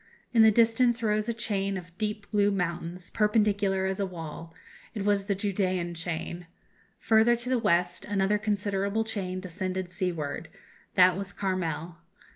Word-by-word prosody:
In 230 - +6
the 220 - +8
distance 230 +2 +3
rose 215 +1 +1
a - - +3
chain 200 -4 -1
of 175 -2 -10
deep 210 -1 -2
blue 205 -1 +3
mountains, 180 -2 -3
perpendicular 205 -3 +2
as 190 +1 -2
a 200 - +1
wall; 165 -2 -8 0.4
it 205 -2 -3
was 205 -1 +2
the 200 -1 0
Judæan 185 -3 -1
chain. 170 +1 -4 0.5
Further 225 +2 +4
to 240 +1 -4
the 255 -2 +2
west, 175 -4 +1
another 205 +1 +1
considerable 200 0 0
chain 190 -4 -3
descended 185 0 -4
seaward; 170 -5 -3 0.5
that 185 -1 +6
was 195 +1 -4
Carmel. 175 -4 -3
195 Hz, 150 wpm, -28 LUFS, 180-210 Hz, 0.5 s, the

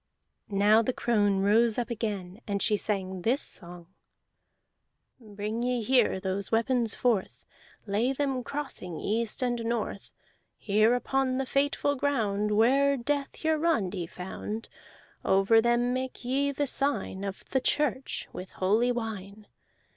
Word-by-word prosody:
Now 205 +2 +4
the 250 +3 -1
crone 205 -6 +1
rose 220 +3 +4
up 245 0 -2
again, 210 -3 -4
and 200 -1 -1
she 210 - +2
sang 190 -3 -2
this 245 +8 +2
song: 175 -1 -3 1.3
"Bring 215 0 -5
ye 245 -1 0
here 245 -4 +3
those 190 +1 -3
weapons 230 0 +1
forth. 230 -6 0 0.4
Lay 220 +5 +1
them 270 -2 -1
crossing, 265 - -5
east 225 +4 -1
and 240 -2 -1
north, 225 -3 -3 0.5
Here 215 +3 +3
upon 260 +1 0
the 270 - -1
fateful 285 +1 +1
ground 215 -7 0
Where 270 +6 +4
death 280 +4 -3
Hiarandi 300 - +1
found. 200 +5 -6 0.5
Over 195 +4 +4
them 240 +1 +2
make 260 -1 -4
ye 275 +3 +1
the 285 +1 -1
sign 275 -8 -1
Of 195 -1 -6
the 265 - +2
church, 270 -1 -1
with 185 - -8
holy 215 +6 +2
wine. 215 -3 -5
230 Hz, 130 wpm, -28 LUFS, 200-255 Hz, 1.3 s, Now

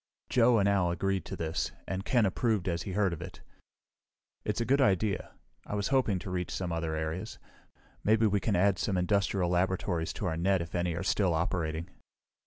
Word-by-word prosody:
Joe 120 -1 +5
and 100 -2 +3
Al 95 -3 +3
had - - 0
agreed 95 -2 -1
to - - -5
this, 80 -1 -2
and 95 0 -3
Ken 120 0 +3
approved 105 0 0
as 85 -1 0
he 95 +1 -5
heard 100 -2 +2
of 85 - -7
it. 90 +1 -9 1.0
"It's 105 - -2
a 120 - 0
good 140 +3 +3
idea. 100 -2 +1 0.3
I - - -5
was 100 -1 -1
hoping 130 -8 +2
to 95 +1 -6
reach 90 -1 -2
some 90 -2 -3
other 80 -1 -2
areas. 80 +3 -4 0.7
Maybe 110 +1 +4
we 100 -1 +2
can 100 +2 0
add 95 +1 +3
some 100 -3 0
industrial 95 -1 +1
laboratories 90 -2 0
to - - -4
our 80 -3 -1
net 95 +3 +2
if 85 -1 -6
any 85 -1 0
are 85 - -3
still 95 -3 +2
operating." 80 -1 -1
95 Hz, 200 wpm, -30 LUFS, 85-100 Hz, 1.0 s, Joe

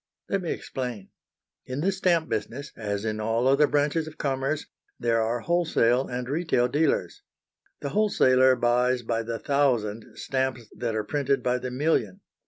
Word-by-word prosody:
Let 195 - 0
me 170 - -4
explain. 125 -7 -5 0.6
In 130 +3 -3
the 190 +4 +2
stamp 175 -4 +1
business, 125 +7 -4
as 105 -1 -3
in 110 -1 -2
all 115 +3 +1
other 140 +2 +5
branches 150 +2 +1
of 155 - -10
commerce, 135 +2 -1 0.3
there 115 -1 +2
are 115 +2 -1
wholesale 135 -7 +2
and 125 0 -4
retail 145 -4 +1
dealers. 145 +4 0 0.6
The 140 - -3
wholesaler 130 -9 +4
buys 125 +1 +2
by 115 0 -1
the 115 0 -4
thousand 120 -7 0
stamps 130 -4 -2
that 115 -2 -2
are 110 - 0
printed 140 +3 0
by 125 0 +1
the 125 0 -4
million. 155 +8 0
130 Hz, 160 wpm, -26 LUFS, 120-145 Hz, 0.6 s, other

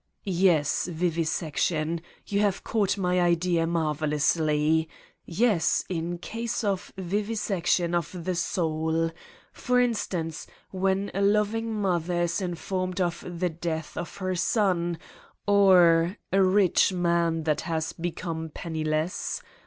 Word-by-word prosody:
"Yes, 175 -7 +2
vivisection. 165 -1 -1 0.2
You 200 - -1
have 205 -2 +1
caught 210 -3 0
my 180 -1 +1
idea 170 -1 +2
marvelously. 155 0 +1 0.4
Yes, 195 -2 +2
in 175 -1 -2
cases 230 +6 -4
of 195 -3 -1
vivisection 190 -3 0
of 170 +1 -2
the 185 - 0
soul. 165 -2 0 0.4
For 250 0 +1
instance, 185 -9 -1 0.2
when 195 +1 0
a 195 - -1
loving 210 +3 +1
mother 180 -4 0
is 170 +3 -1
in 175 -2 -2
formed 185 +1 -3
of 175 -2 -1 0.2
the 180 0 +1
death 160 -1 -4
of 175 - -6
her 185 -1 -2
son 175 -3 +1 0.5
or... 185 -3 +5 0.2
a 195 - +5
rich 190 0 +4
man 170 -2 +1
that 155 -1 0
he - - -9
has 160 -1 -2
become 165 -1 -4
penniless. 155 +1 -2
175 Hz, 120 wpm, -26 LUFS, 165-195 Hz, 0.5 s, or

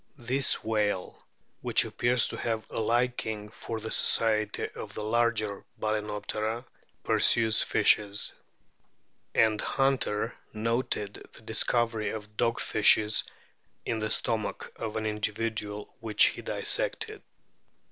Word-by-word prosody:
This 130 +3 0
whale, 105 -4 -1 0.3
which - - +3
appears 120 0 +2
to - - -4
have 115 -2 -2
a - - -2
liking 115 -2 0
for 115 +1 -6
the 110 +1 -6
society 110 -2 +3
of - - -9
the 105 - -4
larger 110 -2 0 0.2
Balcenoptera, 110 +2 -2 0.4
pursues 110 -2 +4
fishes; 100 0 +2 1.0
and 110 -1 +3
Hunter 130 -5 0 0.2
noted 110 -2 -2
the - - -14
discovery 115 0 0
of 105 -1 -7
dog 115 +1 +1
fishes 105 -1 +3 0.6
in 115 - -1
the 110 0 -2
stomach 110 -1 -1
of 110 -1 -4
an 110 - -2
individual 105 0 -2
which 110 -2 +4
he - - -7
dissected. - - -1
110 Hz, 115 wpm, -29 LUFS, 105-115 Hz, 1.0 s, pursues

